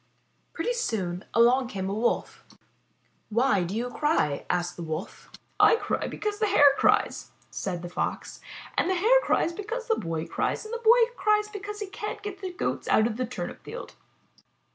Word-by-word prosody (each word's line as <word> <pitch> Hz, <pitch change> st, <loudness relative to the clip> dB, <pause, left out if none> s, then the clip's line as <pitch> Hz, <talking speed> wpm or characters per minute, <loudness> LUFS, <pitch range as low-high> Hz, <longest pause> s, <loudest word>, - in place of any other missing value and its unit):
Pretty 340 Hz, +9 st, -1 dB
soon 195 Hz, -, -2 dB
along 245 Hz, +2 st, +4 dB
came 190 Hz, -5 st, -4 dB
a 195 Hz, -, -2 dB
Wolf. 225 Hz, +3 st, -1 dB, 0.9 s
'Why 220 Hz, -3 st, +2 dB
do 175 Hz, +3 st, -3 dB
you 245 Hz, +2 st, -2 dB
cry?'' 295 Hz, -, 0 dB
asked 175 Hz, 0 st, -1 dB
the -, -, -8 dB
Wolf. 160 Hz, +2 st, -6 dB, 0.3 s
'*I -, -, +7 dB
cry -, -, -2 dB
because 420 Hz, 0 st, -3 dB
the 430 Hz, -, +2 dB
Hare 290 Hz, -8 st, +6 dB
cries/' -, -, +2 dB, 0.2 s
said 180 Hz, -3 st, -4 dB
the -, -, -4 dB
Fox, 175 Hz, -, -4 dB, 0.4 s
''and 345 Hz, -, +1 dB
the 375 Hz, -, +2 dB
Hare 465 Hz, +8 st, +4 dB
cries 340 Hz, -, +1 dB
because 455 Hz, +6 st, -5 dB
the 450 Hz, -, +3 dB
Boy 165 Hz, -3 st, -3 dB
cries, -, -, -2 dB
and 435 Hz, -, -7 dB
the 470 Hz, -, -2 dB
Boy 470 Hz, +1 st, +5 dB
cries 425 Hz, -1 st, +2 dB
because 415 Hz, 0 st, -7 dB
he -, -, -1 dB
can't 420 Hz, +2 st, -6 dB
get 405 Hz, -1 st, -6 dB
the 375 Hz, -2 st, -4 dB
Goats 355 Hz, -, -3 dB
out 215 Hz, -, +4 dB
of 230 Hz, -1 st, -2 dB
the 255 Hz, -1 st, -1 dB
turnip 255 Hz, -, -6 dB
field." -, -, -8 dB
290 Hz, 185 wpm, -27 LUFS, -, 0.9 s, I